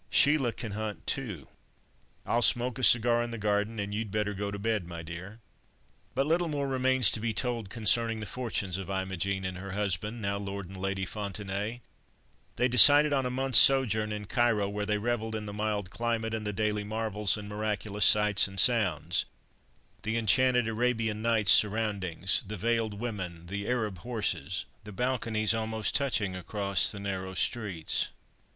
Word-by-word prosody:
Sheila 145 Hz, -5 st, +4 dB
can 115 Hz, -1 st, -7 dB
hunt 105 Hz, 0 st, -5 dB
too. 105 Hz, -, -3 dB, 0.8 s
I'll 120 Hz, -, +1 dB
smoke 120 Hz, +1 st, +2 dB
a -, -, -4 dB
cigar 120 Hz, 0 st, +4 dB
in 120 Hz, -, -3 dB
the 115 Hz, -, -6 dB
garden, 105 Hz, +1 st, -1 dB
and 100 Hz, 0 st, -4 dB
you'd 110 Hz, 0 st, -3 dB
better 105 Hz, 0 st, -1 dB
go 100 Hz, +1 st, -4 dB
to 100 Hz, -, -5 dB
bed, 105 Hz, -3 st, -2 dB
my 85 Hz, -1 st, -7 dB
dear." 90 Hz, +7 st, -9 dB, 0.8 s
But 135 Hz, +1 st, +1 dB
little 170 Hz, +3 st, +1 dB
more 145 Hz, -3 st, -2 dB
remains 130 Hz, -4 st, +3 dB
to -, -, -1 dB
be 110 Hz, 0 st, -2 dB
told 115 Hz, -3 st, -2 dB
concerning 115 Hz, +1 st, +1 dB
the 105 Hz, -, -5 dB
fortunes 100 Hz, -5 st, -3 dB
of 95 Hz, -, -7 dB
Imogen 95 Hz, 0 st, -2 dB
and 90 Hz, -1 st, -4 dB
her 100 Hz, 0 st, -7 dB
husband, 105 Hz, +3 st, -2 dB
now 100 Hz, -2 st, -2 dB
Lord 100 Hz, -1 st, -6 dB
and 95 Hz, -, -11 dB
Lady 95 Hz, 0 st, -2 dB
Fontenaye. 105 Hz, +3 st, -5 dB, 0.7 s
They 125 Hz, -, +2 dB
decided 145 Hz, +5 st, +8 dB
on 135 Hz, -2 st, +1 dB
a -, -, -2 dB
month's 130 Hz, -1 st, +5 dB
sojourn 110 Hz, -6 st, +4 dB
in 105 Hz, -1 st, -5 dB
Cairo, 110 Hz, -2 st, +1 dB
where 105 Hz, 0 st, -4 dB
they 105 Hz, -, +1 dB
revelled 110 Hz, 0 st, -2 dB
in 105 Hz, -1 st, -4 dB
the 105 Hz, -, -6 dB
mild 105 Hz, -2 st, -3 dB
climate, 115 Hz, -1 st, -2 dB
and 110 Hz, -1 st, -3 dB
the -, -, -1 dB
daily 105 Hz, 0 st, -1 dB
marvels 105 Hz, -1 st, -1 dB
and 105 Hz, -1 st, -8 dB
miraculous 105 Hz, 0 st, -3 dB
sights 105 Hz, 0 st, +5 dB
and 95 Hz, 0 st, -6 dB
sounds—the 105 Hz, -, -1 dB
enchanted 125 Hz, +2 st, +3 dB
Arabian 115 Hz, -1 st, -1 dB
Nights' 110 Hz, -4 st, +4 dB
surroundings, 100 Hz, -4 st, +2 dB
the 105 Hz, +1 st, -6 dB
veiled 115 Hz, 0 st, -1 dB
women, 95 Hz, -7 st, -6 dB
the 100 Hz, +3 st, -5 dB
Arab 110 Hz, -7 st, -2 dB
horses, 105 Hz, -, -3 dB, 0.2 s
the 105 Hz, -, -10 dB
balconies, 115 Hz, -2 st, 0 dB
almost 110 Hz, -2 st, -2 dB
touching 115 Hz, -9 st, 0 dB
across 100 Hz, +1 st, +1 dB
the 100 Hz, -, -8 dB
narrow 95 Hz, -1 st, -5 dB
streets. 95 Hz, -5 st, -1 dB
105 Hz, 170 wpm, -29 LUFS, 100-115 Hz, 0.8 s, decided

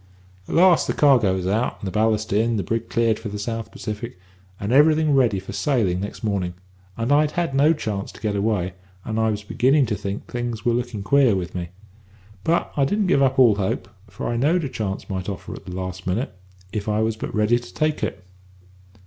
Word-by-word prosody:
"At -, -, -3 dB
last 175 Hz, 0 st, +5 dB
the -, -, 0 dB
cargo 125 Hz, -10 st, +4 dB
was 95 Hz, -1 st, -3 dB
out 105 Hz, +2 st, 0 dB
and 100 Hz, -, -7 dB
the 95 Hz, -, -3 dB
ballast 110 Hz, 0 st, +1 dB
in, 115 Hz, +2 st, +2 dB
the 100 Hz, -, -1 dB
brig 115 Hz, +5 st, -2 dB
cleared 115 Hz, -2 st, +1 dB
for 105 Hz, -, -6 dB
the 105 Hz, -, -5 dB
South 115 Hz, +1 st, -4 dB
Pacific, 110 Hz, 0 st, -6 dB, 0.4 s
and 100 Hz, +3 st, -3 dB
everything 155 Hz, +2 st, +5 dB
ready 120 Hz, -8 st, +3 dB
for 95 Hz, -, -8 dB
sailing 110 Hz, -11 st, +1 dB
next 100 Hz, +3 st, -6 dB
morning, 95 Hz, -5 st, -1 dB, 0.4 s
and 115 Hz, +4 st, -1 dB
I'd 150 Hz, +1 st, +3 dB
had 170 Hz, -5 st, -1 dB
no 145 Hz, +4 st, +5 dB
chance 105 Hz, -10 st, -4 dB
to -, -, -13 dB
get 105 Hz, -2 st, -1 dB
away, 100 Hz, -3 st, 0 dB, 0.3 s
and 110 Hz, 0 st, -2 dB
I 110 Hz, 0 st, +2 dB
was 105 Hz, -1 st, -3 dB
beginning 135 Hz, +7 st, +3 dB
to 105 Hz, -2 st, -1 dB
think 100 Hz, 0 st, -5 dB
things 120 Hz, -3 st, -4 dB
were 120 Hz, -, +3 dB
looking 120 Hz, -4 st, -2 dB
queer 130 Hz, 0 st, +4 dB
with 90 Hz, -2 st, -4 dB
me. 85 Hz, -2 st, -4 dB, 0.7 s
But 170 Hz, +1 st, 0 dB
I 140 Hz, -, +2 dB
didn't 205 Hz, +9 st, +1 dB
give 140 Hz, -, +3 dB
up 135 Hz, 0 st, +2 dB
all 120 Hz, -6 st, +6 dB
hope, 95 Hz, 0 st, -2 dB, 0.2 s
for -, -, -6 dB
I 120 Hz, -, -1 dB
knowed 160 Hz, +8 st, +2 dB
a 140 Hz, -, -2 dB
chance 100 Hz, -5 st, -4 dB
might 95 Hz, -1 st, -4 dB
offer 100 Hz, -, -6 dB
at -, -, -10 dB
the 90 Hz, -1 st, -7 dB
last 95 Hz, 0 st, -5 dB
minute, 95 Hz, +4 st, -1 dB, 0.4 s
if 105 Hz, 0 st, -2 dB
I 105 Hz, +1 st, +1 dB
was 110 Hz, 0 st, 0 dB
but 110 Hz, -, -6 dB
ready 105 Hz, +3 st, +3 dB
to 120 Hz, 0 st, -12 dB
take 155 Hz, 0 st, 0 dB
it. 95 Hz, -1 st, -3 dB
110 Hz, 220 wpm, -23 LUFS, 100-130 Hz, 0.7 s, all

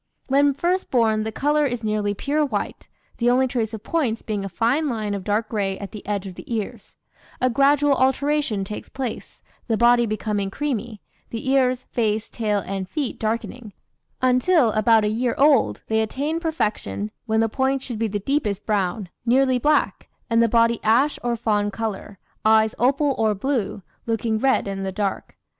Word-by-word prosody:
"When 280 Hz, +1 st, +3 dB
first 360 Hz, +5 st, 0 dB
born 225 Hz, -3 st, +2 dB
the 220 Hz, -, -3 dB
colour 295 Hz, +6 st, +1 dB
is 245 Hz, -3 st, -4 dB
nearly 210 Hz, -1 st, 0 dB
pure 295 Hz, +8 st, 0 dB
white, 220 Hz, -8 st, -3 dB, 0.3 s
the 240 Hz, 0 st, +3 dB
only 255 Hz, +2 st, +4 dB
trace 230 Hz, -4 st, -2 dB
of 220 Hz, -2 st, -7 dB
'points' 260 Hz, -9 st, -1 dB
being 210 Hz, -2 st, -3 dB
a 195 Hz, -, -4 dB
fine 245 Hz, -, +1 dB
line 215 Hz, -4 st, -2 dB
of 200 Hz, -2 st, -4 dB
dark 215 Hz, +2 st, 0 dB
gray 195 Hz, -3 st, -1 dB
at 200 Hz, -, -7 dB
the 210 Hz, -, -9 dB
edge 205 Hz, -1 st, -2 dB
of 190 Hz, -, -7 dB
the 180 Hz, -, -11 dB
ears; 215 Hz, -2 st, -6 dB, 0.4 s
a 255 Hz, 0 st, +2 dB
gradual 280 Hz, +3 st, +4 dB
alteration 265 Hz, -4 st, +1 dB
takes 210 Hz, +2 st, -7 dB
place, 260 Hz, -4 st, -6 dB, 0.2 s
the 225 Hz, -2 st, +1 dB
body 240 Hz, 0 st, +4 dB
becoming 210 Hz, -2 st, -2 dB
creamy, 235 Hz, -4 st, -4 dB, 0.3 s
the 230 Hz, +3 st, -5 dB
ears, 255 Hz, -2 st, +2 dB
face, 220 Hz, -2 st, -1 dB
tail, 210 Hz, -4 st, -1 dB
and 190 Hz, -1 st, -4 dB
feet 290 Hz, -6 st, -3 dB
darkening, 225 Hz, 0 st, -3 dB, 0.5 s
until, 255 Hz, +1 st, +4 dB
about 220 Hz, +1 st, +4 dB
a -, -, +2 dB
year 230 Hz, +3 st, 0 dB
old, 270 Hz, -, +3 dB
they 220 Hz, 0 st, +1 dB
attain 285 Hz, +9 st, -2 dB
perfection, 210 Hz, -, -2 dB, 0.2 s
when 220 Hz, 0 st, +1 dB
the 225 Hz, -, +3 dB
points 265 Hz, +3 st, -1 dB
should 235 Hz, -4 st, -5 dB
be 225 Hz, -, +1 dB
the 205 Hz, 0 st, -2 dB
deepest 210 Hz, -3 st, -1 dB
brown, 200 Hz, -1 st, -1 dB, 0.2 s
nearly 255 Hz, +1 st, +3 dB
black, 300 Hz, +4 st, +1 dB, 0.2 s
and 230 Hz, 0 st, +4 dB
the 230 Hz, -, +3 dB
body 230 Hz, 0 st, +3 dB
ash 245 Hz, +7 st, +3 dB
or 240 Hz, -1 st, 0 dB
fawn 210 Hz, -2 st, 0 dB
colour, 205 Hz, -1 st, -5 dB, 0.3 s
eyes 220 Hz, 0 st, +4 dB
opal 275 Hz, +3 st, +2 dB
or 215 Hz, -2 st, +2 dB
blue, 210 Hz, -4 st, -2 dB, 0.2 s
looking 225 Hz, -1 st, 0 dB
red 265 Hz, -3 st, +2 dB
in 195 Hz, -1 st, -4 dB
the 190 Hz, 0 st, -3 dB
dark. 200 Hz, 0 st, -3 dB
225 Hz, 180 wpm, -23 LUFS, 210-265 Hz, 0.5 s, only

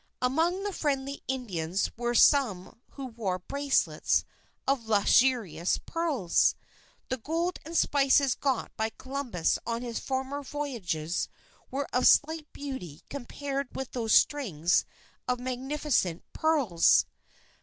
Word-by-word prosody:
Among 325 Hz, +9 st, +1 dB
the 410 Hz, -1 st, -2 dB
friendly 280 Hz, -3 st, -2 dB
Indians 195 Hz, -9 st, -2 dB
were 240 Hz, +1 st, -1 dB
some 225 Hz, -9 st, +3 dB
who 275 Hz, -, -6 dB
wore 225 Hz, -7 st, -3 dB
bracelets 280 Hz, +9 st, +1 dB, 0.4 s
of 265 Hz, -4 st, 0 dB
lustrous 210 Hz, -5 st, +3 dB
pearls. 300 Hz, -, +1 dB, 0.5 s
The 260 Hz, -, -1 dB
gold 330 Hz, +8 st, -2 dB
and 325 Hz, +2 st, -3 dB
spices 275 Hz, -1 st, +4 dB
got 265 Hz, -3 st, -2 dB
by 220 Hz, 0 st, -1 dB
Columbus 255 Hz, -, -1 dB
on 230 Hz, +1 st, -3 dB
his 235 Hz, -2 st, -3 dB
former 265 Hz, +2 st, -3 dB
voyages 220 Hz, -, -3 dB, 0.4 s
were 275 Hz, +1 st, -2 dB
of 250 Hz, -, +4 dB
slight 310 Hz, 0 st, +3 dB
beauty 260 Hz, -, -7 dB
compared 275 Hz, 0 st, -4 dB
with 265 Hz, -1 st, -4 dB
those 225 Hz, -3 st, +1 dB
strings 180 Hz, -, +3 dB, 0.4 s
of 250 Hz, -1 st, 0 dB
magnificent 255 Hz, -, -1 dB
pearls. 280 Hz, -, +3 dB
260 Hz, 115 wpm, -29 LUFS, 220-285 Hz, 0.5 s, spices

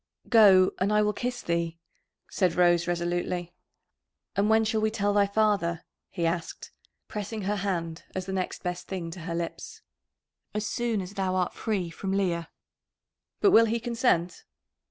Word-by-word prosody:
"Go, 195 Hz, -5 st, +7 dB
and 195 Hz, +3 st, +1 dB
I 210 Hz, 0 st, +4 dB
will 210 Hz, 0 st, +1 dB
kiss 245 Hz, +3 st, -4 dB
thee," 170 Hz, -1 st, -1 dB, 0.5 s
said 180 Hz, -4 st, 0 dB
Rose 175 Hz, -1 st, +3 dB
resolutely. 175 Hz, 0 st, -2 dB, 0.8 s
"And 200 Hz, +2 st, +2 dB
when 220 Hz, 0 st, +4 dB
shall 220 Hz, 0 st, 0 dB
we 220 Hz, -, +2 dB
tell 205 Hz, -2 st, 0 dB
thy 200 Hz, -1 st, +4 dB
father?" 200 Hz, -5 st, +1 dB, 0.3 s
he 170 Hz, -3 st, -2 dB
asked, 165 Hz, 0 st, -3 dB, 0.4 s
pressing 210 Hz, 0 st, -5 dB
her 205 Hz, +2 st, -1 dB
hand, 170 Hz, -4 st, -3 dB
as 185 Hz, -1 st, -3 dB
the 190 Hz, -, -4 dB
next 185 Hz, -1 st, -3 dB
best 180 Hz, 0 st, -4 dB
thing 175 Hz, -3 st, -4 dB
to 185 Hz, -, -8 dB
her 170 Hz, -, -2 dB
lips. 170 Hz, 0 st, -6 dB, 0.7 s
"As 210 Hz, 0 st, -1 dB
soon 230 Hz, -2 st, -1 dB
as 185 Hz, +1 st, -8 dB
thou 190 Hz, -2 st, -1 dB
art 180 Hz, -1 st, 0 dB
free 195 Hz, -7 st, -2 dB
from 190 Hz, +3 st, -4 dB
Leah." 175 Hz, -4 st, 0 dB, 0.9 s
"But 400 Hz, -, +5 dB
will 230 Hz, -6 st, +7 dB
he 230 Hz, +1 st, 0 dB
consent?" 230 Hz, -7 st, 0 dB
190 Hz, 165 wpm, -27 LUFS, 175-210 Hz, 0.9 s, Go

